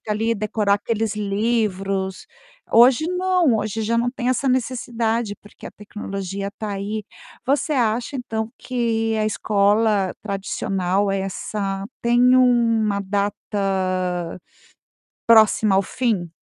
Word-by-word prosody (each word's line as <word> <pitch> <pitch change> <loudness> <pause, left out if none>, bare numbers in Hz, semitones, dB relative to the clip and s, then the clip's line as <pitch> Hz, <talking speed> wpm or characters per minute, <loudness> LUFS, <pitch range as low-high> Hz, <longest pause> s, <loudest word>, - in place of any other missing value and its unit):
que 215 - -8
ali 225 +2 +1
decorar 210 -1 +1
aqueles 220 +1 -2
livros. 195 -2 -1 0.5
Hoje 250 +7 +6
não, 360 -7 +2
hoje 215 +1 -3
já 230 +2 0
não 245 +1 +1
tem 250 -1 -3
essa 260 +1 +1
necessidade, 235 -4 -1
porque 205 - -14
a - - -8
tecnologia 200 -1 -6
está 210 +1 -6
aí. 205 +2 -4 0.4
Você 285 +3 +1
acha, 235 +2 0
então, 225 -3 -4
que 225 -3 -1
a 215 0 +1
escola 205 -1 +2
tradicional 195 -1 -1
é 195 - -1
essa 195 0 -3 0.2
tem 245 +2 +4
uma 230 -5 +3
data 190 -3 -2 0.9
próxima 220 -3 +5
ao 195 - +4
fim? 210 -5 -1
215 Hz, 120 wpm, -22 LUFS, 200-235 Hz, 0.9 s, Hoje